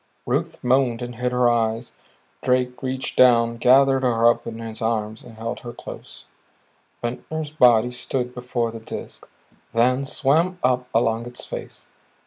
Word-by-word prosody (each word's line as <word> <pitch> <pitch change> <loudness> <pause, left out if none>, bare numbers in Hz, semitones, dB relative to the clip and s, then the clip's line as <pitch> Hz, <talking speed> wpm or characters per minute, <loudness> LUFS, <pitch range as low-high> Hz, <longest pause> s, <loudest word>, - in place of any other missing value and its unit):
Ruth - - -2
moaned 125 -1 +2
and 120 -1 -7
hid 125 +1 -1
her 125 0 +3
eyes; 115 0 0 0.5
Drake 125 0 0
reached 130 0 -3
down, 115 -2 +5
gathered 135 +2 +5
her 115 -2 +3
up - - -6
in 115 -1 -5
his 115 0 -7
arms, 110 -1 -2
held 115 -1 -6
her 120 -1 -8
close. - - -10 0.8
Ventnor's 150 +6 -4
body 125 -5 +4
stood 125 0 -3
before 125 -2 -2
the 115 - -8
Disk, 110 - -8 0.4
then 125 +4 +2
swam 165 +8 +2
up 125 0 +1
along 115 0 +1
its 120 0 -5
face. - - -8
125 Hz, 145 wpm, -23 LUFS, 115-130 Hz, 0.8 s, down